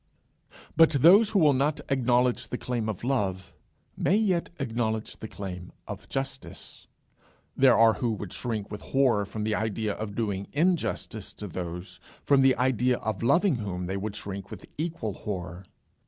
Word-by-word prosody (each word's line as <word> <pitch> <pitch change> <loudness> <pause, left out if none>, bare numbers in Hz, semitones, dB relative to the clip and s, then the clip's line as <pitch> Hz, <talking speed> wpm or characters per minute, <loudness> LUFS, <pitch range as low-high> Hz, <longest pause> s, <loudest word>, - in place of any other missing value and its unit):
But 165 +1 +7
those 200 +6 +8
who 210 - +1
will 155 -6 +5
not 140 +3 +1
acknowledge 125 -2 +2
the 125 - -4
claim 120 -4 -2
of 105 -1 -5
love, 95 -8 -1 0.4
may 190 - +2
yet 195 -6 +1
acknowledge 115 -4 -2
the 110 - -7
claim 90 -4 -7 0.2
of - - -8
justice. 135 0 -6 0.7
There 130 -2 +5
are 115 0 +6
who 120 +1 -1
would 105 -3 -6
shrink 110 -5 -3
with 105 - -6
horror 125 -7 +2
from 105 +2 -5
the 110 0 0
idea 110 0 -1
of 105 -1 -6
doing 100 -4 -2
injustice 155 - -1
to 105 - -7
those, 90 0 -6 0.2
from 140 -1 +4
the 130 -1 +5
idea 125 0 +2
of 110 -3 -3
loving 140 - +3
whom 90 -5 -4
they 95 +2 -3
would 100 +1 -4
shrink 100 -2 -6
with - - -9
equal 155 - -3
horror. 90 -2 -6
115 Hz, 165 wpm, -27 LUFS, 100-135 Hz, 0.7 s, those